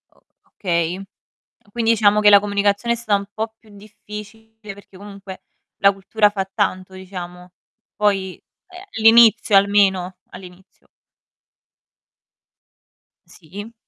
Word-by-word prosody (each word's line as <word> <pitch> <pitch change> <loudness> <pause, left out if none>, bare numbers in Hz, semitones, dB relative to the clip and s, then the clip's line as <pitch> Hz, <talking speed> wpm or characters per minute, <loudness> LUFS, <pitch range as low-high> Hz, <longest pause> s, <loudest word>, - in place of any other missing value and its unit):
O - - -28 0.4
okay. 170 -1 -2 0.7
Quindi 230 0 0
diciamo 210 -2 +3
che 210 - +6
la 200 -1 +8
comunicazione 205 +3 -1
è - - -11
stata 215 -3 0
un 200 - -9
po' 220 0 -5
più 220 - -23
difficile, 210 +1 -12
perché 195 -1 -17
comunque 195 -1 -11 0.4
la 200 - +4
cultura 205 +2 +1
fa 195 -2 -5
tanto, 190 -2 -3
diciamo. 180 -1 -10 0.4
Poi, 195 -3 -1 0.3
ehm, 365 0 -13 0.2
all'inizio 225 -1 +5
almeno 195 -2 +1
all'inizio. 185 0 -16 2.4
Sì. 205 +7 -12
200 Hz, 110 wpm, -19 LUFS, 190-215 Hz, 2.4 s, la